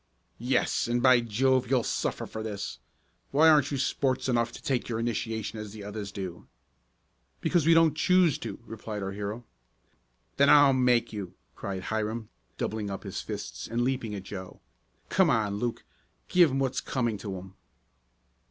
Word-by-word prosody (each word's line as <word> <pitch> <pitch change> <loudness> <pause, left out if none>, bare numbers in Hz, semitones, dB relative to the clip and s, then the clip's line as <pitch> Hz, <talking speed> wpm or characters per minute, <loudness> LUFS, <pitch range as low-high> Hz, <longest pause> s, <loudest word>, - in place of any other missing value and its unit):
"Yes, 125 0 +1
and 120 +1 +1
by 130 -2 +7
Jove, 125 +3 +1
you'll 130 -3 +3
suffer - - -2
for 110 - -6
this! 105 -2 -5 0.5
Why 155 +4 +5
aren't 150 -3 +5
you 140 - -2
sports 130 -1 0
enough 120 -2 +1
to - - -10
take 130 -3 -1
your 115 - -1
initiation 110 -2 -2
as 105 -1 -7
the 105 -2 -8
others 105 0 -6
do?" 90 -3 -7 0.9
"Because 165 -4 +1
we 165 - +7
don't 165 -2 +5
choose 180 -1 +3
to," - - -6
replied 110 -2 -6
our 95 - -3
hero. 105 +4 -5 0.9
"Then 140 +1 +5
I'll 145 -2 +7
make 125 -3 +2
you!" 100 -4 -6 0.2
cried 95 -1 -5
Hiram, 110 +1 -3 0.3
doubling 105 -1 -2
up 95 - -5
his - - -5
fists - - -6
and 120 +2 -1
leaping 125 -4 -1
at 95 - -6
Joe. 95 -1 -8 0.5
"Come 190 -3 +4
on, 105 -6 +1
Luke, 120 0 -2 0.5
give 175 -3 +6
'em 135 - -1
what's 135 -1 0
coming 120 -5 -1
to 100 -2 -5
'em!" 95 +1 -10
115 Hz, 170 wpm, -28 LUFS, 105-135 Hz, 0.9 s, by